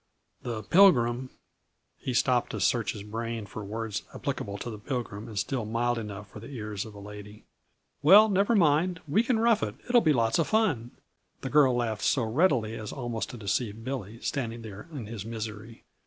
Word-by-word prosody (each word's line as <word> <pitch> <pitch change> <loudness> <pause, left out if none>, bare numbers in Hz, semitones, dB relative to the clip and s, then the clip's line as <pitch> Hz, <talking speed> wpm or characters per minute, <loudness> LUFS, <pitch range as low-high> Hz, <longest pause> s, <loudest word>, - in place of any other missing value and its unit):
The 115 -3 -4
Pilgrim 125 - +4 0.4
" - - -48 0.3
He 130 - -3
stopped 125 -1 +2
to - - -3
search 115 -4 +1
his 105 - -8
brain 115 +1 -4
for 105 +2 -7
words 110 0 -4
applicable 100 0 -3
to 120 - -5
the 105 - -8
Pilgrim 115 -4 -4
and 110 - -8
still 120 +5 -1
mild 120 +2 0
enough 105 -2 -7
for - - -9
the 115 - -10
ears 105 -6 -5
of 110 -1 -11
a - - -9
lady. 105 +1 -10 0.6
"Well, 200 +9 +8
never 200 +3 +2
mind. 165 0 +3
We 155 +10 +3
can 235 0 +1
rough 225 -1 +3
it - - -2
it 245 - -4
will 240 - +7
be 155 - +3
lots 115 -2 +2
of 165 - +2
fun!" 185 - +1 0.5
the 130 - -4
girl 140 -4 +5
laughed 115 -3 -1
so 135 -5 +2
readily 115 -2 +2
as 110 -1 -6
almost 120 -4 -4
to 125 - -8
deceive 110 +1 -2
Billy, 115 -4 -5
standing 115 -4 -3
there 105 +4 -9
in 135 -8 -6
his 105 -2 -6
misery. 110 0 -7
115 Hz, 200 wpm, -28 LUFS, 110-140 Hz, 0.6 s, Well